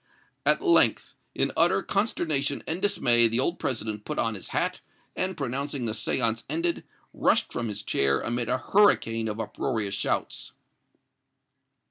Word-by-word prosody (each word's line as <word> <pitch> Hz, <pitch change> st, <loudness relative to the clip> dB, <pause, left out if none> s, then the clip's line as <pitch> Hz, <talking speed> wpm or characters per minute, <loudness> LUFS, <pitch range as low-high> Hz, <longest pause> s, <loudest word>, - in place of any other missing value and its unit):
At -, -, +3 dB
length, 350 Hz, -3 st, +4 dB, 0.2 s
in -, -, 0 dB
utter -, -, +3 dB
consternation 155 Hz, -9 st, -1 dB
and 165 Hz, +3 st, -3 dB
dismay 120 Hz, -, +4 dB
the 115 Hz, +2 st, -1 dB
old 170 Hz, +7 st, +1 dB
President 110 Hz, -4 st, -3 dB
put 150 Hz, -, -5 dB
on 115 Hz, -1 st, 0 dB
his 95 Hz, -, -8 dB
hat, -, -, -2 dB, 0.3 s
and, 185 Hz, -1 st, -1 dB
pronouncing 140 Hz, -1 st, -3 dB
the 110 Hz, -, -1 dB
séance 110 Hz, +1 st, -1 dB
ended, 165 Hz, +3 st, -1 dB, 0.3 s
rushed -, -, +1 dB
from 120 Hz, -, -3 dB
his 105 Hz, -1 st, -5 dB
chair 70 Hz, -6 st, +1 dB
amid 120 Hz, 0 st, -3 dB
a -, -, +1 dB
hurricane 115 Hz, -, +2 dB
of 110 Hz, 0 st, -4 dB
uproarious 110 Hz, -1 st, -2 dB
shouts." -, -, -2 dB
120 Hz, 145 wpm, -26 LUFS, 110-160 Hz, 0.3 s, length